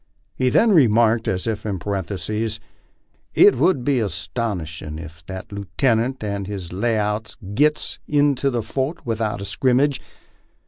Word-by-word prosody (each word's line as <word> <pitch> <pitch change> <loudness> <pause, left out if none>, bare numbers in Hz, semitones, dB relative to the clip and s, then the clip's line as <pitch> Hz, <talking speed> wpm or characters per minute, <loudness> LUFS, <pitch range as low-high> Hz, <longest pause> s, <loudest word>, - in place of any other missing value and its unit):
He 130 -1 +1
then 225 - +4
remarked, 115 - +4
as 95 -1 -1
if 110 -2 -2
in 100 -3 -2
parenthesis, 100 +3 -3 0.8
"It 405 +1 +7
would 160 -10 +2
be 135 -1 +2
astonishin' 90 -8 -3
ef 80 0 -10
that 95 -1 -7
lootenint 115 +5 0
and 100 -2 -3
his 95 -4 -6
lay 115 +4 0
out 105 +1 -2 0.2
gits 150 +6 +1
into 145 -2 +2
the 120 -3 -1
fort 135 +8 -3
without 110 -3 -2
a - - -4
scrimmage. 135 +5 +2
110 Hz, 140 wpm, -22 LUFS, 100-130 Hz, 0.8 s, It